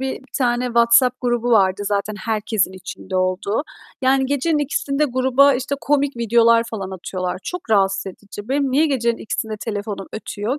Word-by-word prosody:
bir 265 Hz, 0 st, -5 dB
tane 245 Hz, -1 st, +1 dB
WhatsApp 235 Hz, +1 st, +4 dB
grubu 240 Hz, -1 st, 0 dB
vardı 195 Hz, -3 st, +3 dB
zaten 205 Hz, +1 st, -1 dB
herkesin 215 Hz, -3 st, -1 dB
içinde 185 Hz, 0 st, -7 dB
olduğu. 185 Hz, +5 st, 0 dB, 0.4 s
Yani 265 Hz, +1 st, +3 dB
gecenin 285 Hz, +3 st, 0 dB
02.00'ında 290 Hz, 0 st, 0 dB
gruba, 265 Hz, +1 st, +3 dB
işte, 265 Hz, +3 st, -2 dB
komik 285 Hz, -2 st, 0 dB
videolar 230 Hz, 0 st, +4 dB
falan 195 Hz, -4 st, -5 dB
atıyorlar. 185 Hz, -1 st, -4 dB
Çok 360 Hz, -10 st, -6 dB
rahatsız 195 Hz, -2 st, +2 dB
edici. 205 Hz, +3 st, -9 dB
Benim 275 Hz, 0 st, 0 dB
niye 295 Hz, +5 st, +3 dB
gecenin 235 Hz, -5 st, 0 dB
02.00'ında 220 Hz, -1 st, -4 dB
telefonum 205 Hz, -3 st, -5 dB
ötüyor 220 Hz, +4 st, -4 dB
235 Hz, 155 wpm, -20 LUFS, 205-265 Hz, 0.4 s, WhatsApp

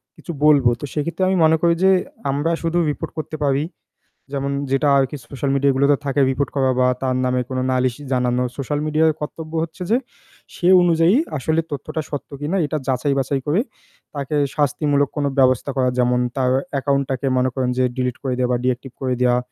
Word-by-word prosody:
কিছু 170 Hz, -, -8 dB
বলব। 145 Hz, -4 st, +5 dB
তো 145 Hz, -, -5 dB
সে 150 Hz, -, -2 dB
ক্ষেত্রে 175 Hz, +3 st, -2 dB
আমি 190 Hz, -, +2 dB
মনে 160 Hz, 0 st, +5 dB
করি 170 Hz, -1 st, +4 dB
যে 190 Hz, -, +6 dB, 0.4 s
আমরা 145 Hz, +4 st, 0 dB
শুধু 165 Hz, +1 st, -1 dB
report 155 Hz, +2 st, -4 dB
করতে 155 Hz, 0 st, -5 dB
পারি। 140 Hz, +1 st, +1 dB, 0.7 s
যেমন 140 Hz, 0 st, -2 dB, 0.2 s
যেটা 135 Hz, +2 st, +2 dB
আর 135 Hz, -, +4 dB
কি -, -, -6 dB
social 135 Hz, 0 st, -3 dB
media 140 Hz, +1 st, +3 dB
গুলোতে 140 Hz, +2 st, +4 dB
থাকে 140 Hz, +1 st, 0 dB
report 135 Hz, +2 st, -1 dB
করা 135 Hz, -2 st, +2 dB
বা 125 Hz, -, +4 dB
তার 130 Hz, -1 st, 0 dB
নামে 125 Hz, 0 st, +1 dB
কোনো 130 Hz, -1 st, -2 dB
নালিশ 130 Hz, -1 st, +1 dB, 0.2 s
জানানো। 125 Hz, 0 st, +1 dB
social 145 Hz, +2 st, -2 dB
media-র 155 Hz, +1 st, +3 dB
কর্তব্য 155 Hz, +1 st, -6 dB
হচ্ছে 170 Hz, +2 st, -7 dB
যে 235 Hz, -, +5 dB, 0.6 s
সে 175 Hz, -, -1 dB
অনুযায়ী 170 Hz, +2 st, +4 dB, 0.2 s
আসলে 160 Hz, +4 st, 0 dB
তথ্যটা 150 Hz, +2 st, -4 dB
সত্য 145 Hz, -, -5 dB
কিনা 165 Hz, +7 st, -1 dB
এটা 155 Hz, +1 st, -2 dB
যাচাই-বাছাই 135 Hz, +1 st, 0 dB
করে 160 Hz, +8 st, +2 dB, 0.6 s
তাকে 140 Hz, +1 st, -3 dB, 0.2 s
শাস্তিমূলক 145 Hz, -1 st, +1 dB
কোনো 145 Hz, -1 st, +1 dB
ব্যবস্থা 130 Hz, +1 st, +3 dB
করা। 130 Hz, -1 st, +2 dB
যেমন 125 Hz, 0 st, +2 dB, 0.2 s
তার 130 Hz, -1 st, +2 dB, 0.3 s
account 140 Hz, 0 st, +1 dB
টাকে 135 Hz, +1 st, -2 dB
মনে 130 Hz, 0 st, +2 dB
করেন 130 Hz, -1 st, -1 dB
যে 130 Hz, -, +3 dB
delete 125 Hz, -2 st, -2 dB
করে 130 Hz, -, -1 dB
দেওয়া 125 Hz, -1 st, +1 dB
বা -, -, +2 dB
deactivate 130 Hz, 0 st, -2 dB
করে 130 Hz, -1 st, 0 dB
দেওয়া, 125 Hz, -1 st, +3 dB
140 Hz, 195 wpm, -21 LUFS, 130-155 Hz, 0.7 s, যে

